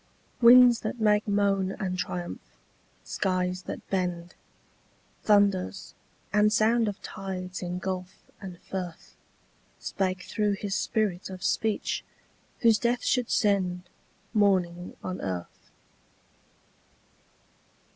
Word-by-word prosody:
Winds 245 0 +8
that 215 +2 -4
make 210 -1 +3
moan 200 -2 +1
and 185 -2 -3
triumph, 180 -1 -5 0.5
skies 185 -1 -1
that - - -6
bend, 180 -2 -2 0.9
Thunders, 200 - +2 0.4
and 210 0 +4
sound 225 +1 +3
of 205 0 -4
tides 185 -1 -6
in 180 0 -3
gulf 185 0 -4 0.3
and 185 -3 -8
firth, 180 -3 -7 0.6
Spake 185 -2 -2
through 210 -2 0
his 200 0 -4
spirit 200 -5 -1
of 185 0 -8
speech, 215 +2 0 0.6
whose 225 -3 +5
death 240 0 0
should 250 -3 +1
send 185 -3 +1 0.5
Mourning 180 -4 +1
on 185 0 -4
earth. 90 -3 -6
195 Hz, 105 wpm, -27 LUFS, 180-210 Hz, 0.9 s, Winds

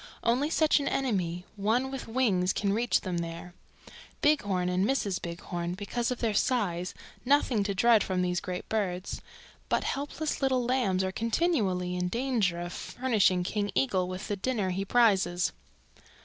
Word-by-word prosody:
Only 250 +6 +2
such 315 -1 +3
an 280 - -2
enemy, 180 -9 -1
one 230 +6 +1
with 270 -2 -6
wings, 215 -7 +1
can 200 -1 0
reach 235 +3 +2
them 180 -3 -2
there. 170 +1 -6 0.7
Bighorn 205 -12 +2
and 180 +1 +1
Mrs. 205 -5 0
Bighorn, 170 +1 -4
because 235 +5 -2
of 250 - -2
their 225 -3 +1
size, 190 -7 0 0.3
nothing 260 -4 +3
to 200 -1 -1
dread 230 0 +5
from 185 -1 -1
these 180 -1 0
great 180 -1 -5
birds, 190 -4 -2 0.5
but - - +1
helpless 290 +2 -3
little 260 -2 +2
lambs 235 -7 +1
are 190 - -1
continually 210 - 0
in 180 0 -1
danger 230 -6 0
of 175 +1 -5
furnishing 215 -8 +1
King 205 +2 -1
Eagle 190 -9 +1
with 185 +2 -5
the 205 - -1
dinner 200 -2 -1
he 190 +2 -2
prizes. 195 -5 +3
205 Hz, 160 wpm, -29 LUFS, 180-245 Hz, 0.7 s, dread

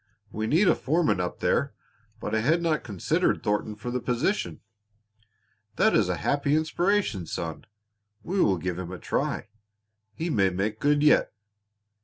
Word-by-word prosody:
We 110 +1 -3
need 170 - +3
a - - +6
foreman 155 - +1
up 90 -1 -3
there, - - +1 0.4
but - - -5
I 110 - +2
had 155 +10 +2
not 160 -2 +1
considered 100 -6 0
Thornton 105 +1 -1
for 115 +3 -6
the 125 - -1
position. 125 - -1 1.1
That - - +3
is - - +3
a - - +1
happy 140 +1 +1
inspiration, 160 - 0
son. 80 0 -5 0.6
We 190 +1 0
will 95 -3 +3
give 90 +1 -3
him 90 -1 -6
a 90 - -6
try. - - -2 0.7
He 165 +1 -2
may 100 -7 +3
make 100 +4 -2
good 145 0 +2
yet." 150 - +4
120 Hz, 160 wpm, -26 LUFS, 95-155 Hz, 1.1 s, a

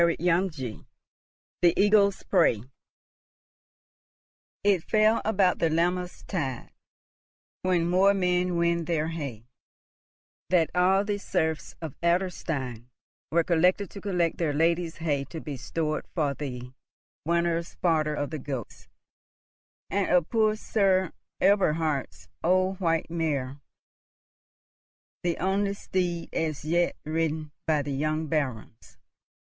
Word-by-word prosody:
CHAPTER 170 +2 +2
X 160 - -15 1.0
THE 175 -1 +4
EAGLE'S 200 -1 +4
PREY 165 - +3 2.0
"IT 200 -4 +3
fell 215 +1 +3
about 195 -4 +2
the 165 - +2
Lammas 175 +2 -1
tide, 135 - -3 0.9
When 180 -2 +1
moor 190 +3 +4
men 180 -1 +1
win 170 0 +1
their 160 -1 0
hay," 140 -9 -6 1.0
that 165 -4 +3
all 190 +3 +3
the 205 -1 -1
serfs 160 -4 -2
of 155 -5 -5
Adlerstein 160 - -1 0.4
were 170 +1 +3
collected 180 +3 +2
to 200 - -9
collect 180 -5 0
their 160 -4 0
lady's 165 +2 +1
hay 150 -4 -1
to 160 - -7
be 150 -3 -6
stored 155 +4 -3
for 150 -5 +1
the 125 -3 -6 0.5
winter's 170 +1 0
fodder 155 -3 +1
of 145 0 -3
the 155 - -4
goats, 130 -5 -6 1.0
and 200 0 0
of 180 -3 +3
poor 215 -2 +2
Sir 190 -4 +1 0.3
Eberhard's 160 -7 +1 0.2
old 185 +2 +2
white 165 -3 0
mare, 145 -5 -2 1.6
the 175 -1 -1
only 195 +2 0
steed 175 -3 -2
as 155 -2 -2
yet 170 +2 +1
ridden 155 -1 -1 0.2
by 155 -2 +2
the 140 0 -3
young 155 +3 -1
Barons. 130 -8 -4
170 Hz, 120 wpm, -27 LUFS, 155-185 Hz, 2.0 s, THE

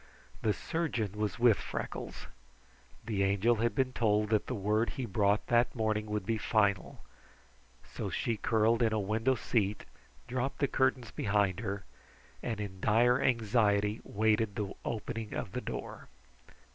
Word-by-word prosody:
The 110 - +2
surgeon 120 - -2
was 105 +1 -2
with 115 -4 +5
Freckles. - - -5 0.8
The 105 -3 -1
Angel 100 +4 +3
had 115 +2 0
been 130 -2 +1
told 105 -2 +1
that 110 -2 +2
the 125 - -2
word 105 +3 +1
he 130 - -2
brought 100 -1 +1
that 120 +2 +2
morning 110 -2 0
would 105 -2 -2
be 110 +1 0
final, 100 -4 +1 0.9
so - - -3
she 115 - -1
curled 110 +2 +2
in 110 -2 +3
a 110 - +1
window 110 +6 +1
seat, 105 -3 -1 0.4
dropped 130 +2 -2
the 140 - +1
curtains 130 -3 +1
behind 100 -3 +1
her, 100 -3 -4 0.6
and 115 -3 -3
in 100 -2 -5
dire 120 +5 +4
anxiety, 105 -3 +2
waited 110 0 +1
the 100 -2 -3
opening 115 -1 -4
of - - -4
the - - -3
door. - - -6
110 Hz, 150 wpm, -31 LUFS, 105-120 Hz, 0.9 s, with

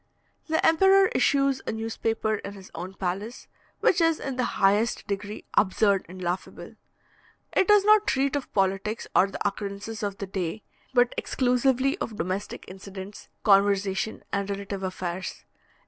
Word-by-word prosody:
The 320 0 +1
emperor 385 +4 +5
issues 275 -1 +2
a - - 0
newspaper 225 -1 -1
in 200 - -7
his 195 -2 -13
own 180 +3 -7
palace, 195 +6 -4 0.3
which 355 - +3
is 330 -1 +3
in 270 -2 -4
the 255 - 0
highest 205 +4 +2
degree 205 +1 -5
absurd 200 0 +2
and 185 +1 -10
laughable. 180 +1 -4 0.8
It 380 - +3
does 415 -1 +6
not 425 0 +5
treat 275 +1 +1
of 285 - -4
politics 195 +3 0
or 190 - +6
the 200 - -2
occurrences 200 +2 -5
of 200 -2 -3
the 200 - -4
day, 190 +1 -4 0.3
but 245 -2 +3
exclusively 260 +4 +1
of 225 - -4
domestic 185 +4 -4
incidents, 190 +1 -9
conversation 200 0 +2
and 200 0 -1
relative 200 0 -4
affairs. 185 -1 -5
205 Hz, 145 wpm, -26 LUFS, 195-255 Hz, 0.8 s, does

